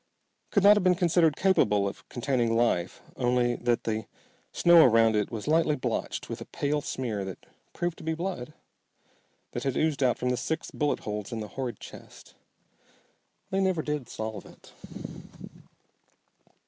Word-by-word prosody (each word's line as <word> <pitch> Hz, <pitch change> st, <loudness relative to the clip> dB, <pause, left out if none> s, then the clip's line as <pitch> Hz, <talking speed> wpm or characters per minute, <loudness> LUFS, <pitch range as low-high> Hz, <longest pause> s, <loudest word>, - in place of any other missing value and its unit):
Could 200 Hz, -, +2 dB
not 205 Hz, +1 st, +8 dB
have 205 Hz, -, +1 dB
been 185 Hz, -1 st, +4 dB
considered 170 Hz, -3 st, +3 dB
capable 105 Hz, -, +3 dB
of 100 Hz, -, -8 dB
containing 120 Hz, -2 st, 0 dB
life 95 Hz, -7 st, 0 dB
only 120 Hz, -1 st, +2 dB
that 120 Hz, -1 st, 0 dB
the 110 Hz, -1 st, -2 dB, 0.4 s
snow 170 Hz, -1 st, +6 dB
around 115 Hz, -3 st, +5 dB
it 105 Hz, -1 st, 0 dB
was 110 Hz, 0 st, -6 dB
lightly 155 Hz, -1 st, +3 dB
blotched 125 Hz, -4 st, -3 dB
with -, -, -6 dB
a -, -, -6 dB
pale 145 Hz, +1 st, -1 dB
smear 115 Hz, -8 st, -3 dB
that 95 Hz, -1 st, -8 dB, 0.3 s
proved 175 Hz, -1 st, -3 dB
to -, -, -10 dB
be 160 Hz, 0 st, -1 dB
blood, 165 Hz, -6 st, -5 dB, 1.0 s
that -, -, -4 dB
had 135 Hz, -2 st, -1 dB
oozed 155 Hz, -3 st, +1 dB
out 125 Hz, -2 st, +3 dB
from 125 Hz, -, -1 dB
the 125 Hz, -, 0 dB
six 160 Hz, +5 st, -3 dB
bullet 145 Hz, -1 st, -1 dB
holes 105 Hz, -1 st, -5 dB
in 115 Hz, -, -3 dB
the 105 Hz, -, -6 dB
horrid 125 Hz, -5 st, -5 dB
chest. -, -, -13 dB, 1.2 s
They 190 Hz, -, +1 dB
never 185 Hz, -4 st, +1 dB
did 150 Hz, -5 st, -3 dB
solve 110 Hz, -1 st, -6 dB
it. -, -, -17 dB
130 Hz, 160 wpm, -28 LUFS, 115-160 Hz, 1.2 s, not